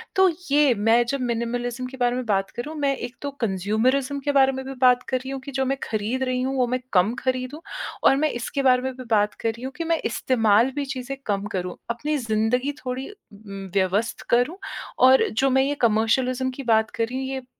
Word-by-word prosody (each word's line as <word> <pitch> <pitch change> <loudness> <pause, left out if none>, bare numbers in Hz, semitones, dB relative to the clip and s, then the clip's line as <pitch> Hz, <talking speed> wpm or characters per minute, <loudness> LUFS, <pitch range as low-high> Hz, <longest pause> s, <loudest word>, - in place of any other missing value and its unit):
तो 380 0 +6 0.2
ये 290 -3 +5
मैं 225 +3 +4
जब 275 +2 -2
मिनिमलिज़्म 240 +1 -2
के 265 - -10
बारे 245 -1 +1
में 255 - -3
बात 195 -3 0
करूँ, 295 +7 -5
मैं 280 -2 +1
एक 245 0 -6
तो 285 0 -3
कंज़्यूमरिज़्म 230 +8 0
के 285 - +2
बारे 270 -1 +5
में 265 0 -5
भी 270 - -5
बात 250 -1 +5
कर 260 - +1
रही 260 +1 -7
हूँ 270 - -4
कि 280 - -8
जो - - +2
मैं 270 +1 0
खरीद 225 +5 -2
रही 255 0 -1
हूँ, 265 +1 -1
वो 250 -1 +2
मैं 255 +1 -1
कम 190 +5 +4
खरीदूँ, 260 +4 -2 0.4
और - - +6
मैं 305 +1 +2
इसके 275 +2 -2
बारे 250 -1 +5
में 260 0 -2
भी 255 - -7
बात 210 -1 +3
कर 225 - +1
रही 230 +3 -6
हूँ 265 0 -5
कि 335 - -2
मैं 330 -1 +1
इस्तेमाल 230 0 +2
भी 285 -1 -1
चीज़ें 260 +2 -5
कम 200 -1 -1
करूँ। 180 0 -4
अपनी 295 +6 -1
ज़िंदगी 230 +3 0
थोड़ी 255 +1 -4
उम, 200 - -11
व्यवस्थ 195 +4 0
करूँ 245 +10 +2 0.5
और 260 0 +5
जो 270 +5 +1
मैं 265 +1 +3
ये 285 +1 0
कमर्शियलिज़्म 250 +4 +1
की 275 - -5
बात 220 -2 +3
कर 230 - -1
रही 255 +2 -5
हूँ, 265 0 -3
ये - - -2
उम, 250 - -16
255 Hz, 230 wpm, -24 LUFS, 225-270 Hz, 0.5 s, तो